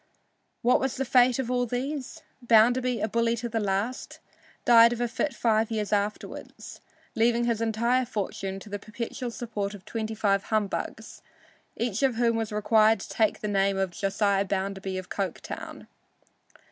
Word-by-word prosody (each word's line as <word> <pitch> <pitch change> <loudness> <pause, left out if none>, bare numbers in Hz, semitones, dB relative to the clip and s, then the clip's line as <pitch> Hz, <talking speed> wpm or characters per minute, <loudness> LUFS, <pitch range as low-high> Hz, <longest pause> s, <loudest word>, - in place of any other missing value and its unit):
What 245 +2 +4
was 265 -1 -1
the 270 - -2
fate 250 -1 +4
of 255 -2 -2
all 245 -1 +1
these? 265 +3 -4 0.2
Bounderby, 240 +2 +3
a - - +1
bully 230 +1 +1
to 235 +1 -4
the 225 -1 -2
last, 205 +4 -2 0.5
died 235 0 +7
of 240 - -6
a 240 - +1
fit 285 +5 -1
five 225 -3 +1
years 215 -2 -2
afterward, 205 +1 -2 0.6
leaving 235 +1 +2
his 230 -2 0
entire 235 +3 +1
fortune 195 -3 -4
to 210 - -11
the 205 - -3
perpetual 235 +4 -5
support 215 -4 -4
of 190 - -14
twenty 220 -1 -4
five 200 -2 +1
humbugs, 215 -3 -3 0.6
each 230 -1 -1
of 265 -3 +2
whom 230 0 +2
was 225 -1 -2
required 215 +1 +4
to - - -8
take 220 -2 +1
the 210 - -2
name 195 -1 +1
of 190 -2 0
"Josiah 195 +1 +1
Bounderby 195 0 -3
of 185 0 -6
Coketown." 195 -4 -5
225 Hz, 165 wpm, -27 LUFS, 205-240 Hz, 0.6 s, died